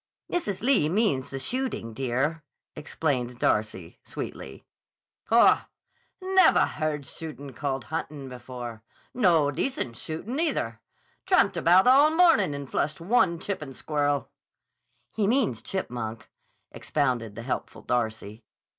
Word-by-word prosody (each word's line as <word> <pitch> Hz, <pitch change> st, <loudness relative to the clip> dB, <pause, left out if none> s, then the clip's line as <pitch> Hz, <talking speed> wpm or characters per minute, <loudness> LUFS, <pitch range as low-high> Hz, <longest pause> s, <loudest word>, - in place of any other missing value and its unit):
"Mrs. 220 Hz, -, -2 dB
Lee 240 Hz, -, +3 dB
means 185 Hz, -, +1 dB
the 135 Hz, -, -5 dB
shooting, 245 Hz, -, -3 dB
dear," 135 Hz, +6 st, -1 dB, 0.3 s
explained 135 Hz, -5 st, -2 dB
Darcy, 105 Hz, -7 st, -1 dB
sweetly. 65 Hz, -, -7 dB, 0.6 s
"Haw! 230 Hz, +1 st, +5 dB, 0.5 s
Nevah 375 Hz, -2 st, +5 dB
heard 150 Hz, -3 st, -3 dB
shootin' 145 Hz, -1 st, -8 dB
called 135 Hz, 0 st, -3 dB
huntin' 140 Hz, +5 st, -5 dB
before. 125 Hz, -3 st, -8 dB, 0.3 s
No 170 Hz, -, +3 dB
decent 145 Hz, -, -2 dB
shootin', 195 Hz, -, -5 dB
either. 115 Hz, -, -1 dB, 0.5 s
Tramped -, -, +4 dB
about 180 Hz, +3 st, +5 dB
all 275 Hz, +4 st, +7 dB
mornin' 315 Hz, -, +4 dB
and 140 Hz, -1 st, -6 dB
flushed 145 Hz, +3 st, -2 dB
one 170 Hz, -1 st, +2 dB
chippin' 160 Hz, -7 st, -5 dB
squirrel." 145 Hz, -1 st, -1 dB, 0.8 s
"He 210 Hz, -3 st, 0 dB
means 225 Hz, -, +1 dB
chipmunk," 120 Hz, -, -5 dB, 0.4 s
expounded 125 Hz, -7 st, -1 dB
the 115 Hz, -, -7 dB
helpful 125 Hz, -, -4 dB
Darcy. 110 Hz, -2 st, -2 dB
145 Hz, 115 wpm, -26 LUFS, 125-205 Hz, 0.8 s, all